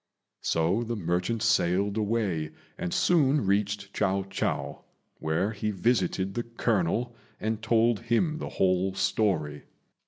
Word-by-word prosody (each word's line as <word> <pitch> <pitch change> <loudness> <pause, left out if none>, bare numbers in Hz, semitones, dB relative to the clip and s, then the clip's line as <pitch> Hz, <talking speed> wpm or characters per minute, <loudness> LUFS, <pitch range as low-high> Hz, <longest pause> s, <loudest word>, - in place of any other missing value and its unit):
So 85 +7 +1
the 120 0 -3
merchant 90 +4 -1
sailed 100 -3 +2
away 105 -8 0 0.3
and 180 -1 -4
soon 150 - +3
reached 100 0 0
Chiao 95 +1 +1
chou, 95 - -2 0.4
where 80 +7 0
he 105 0 -3
visited 95 -2 0
the 120 - -1
colonel 115 0 -1 0.2
and 110 0 -2
told 115 0 +3
him 120 +8 0
the - - -4
whole 95 0 +1
story. 75 -10 0
105 Hz, 125 wpm, -28 LUFS, 95-115 Hz, 0.4 s, soon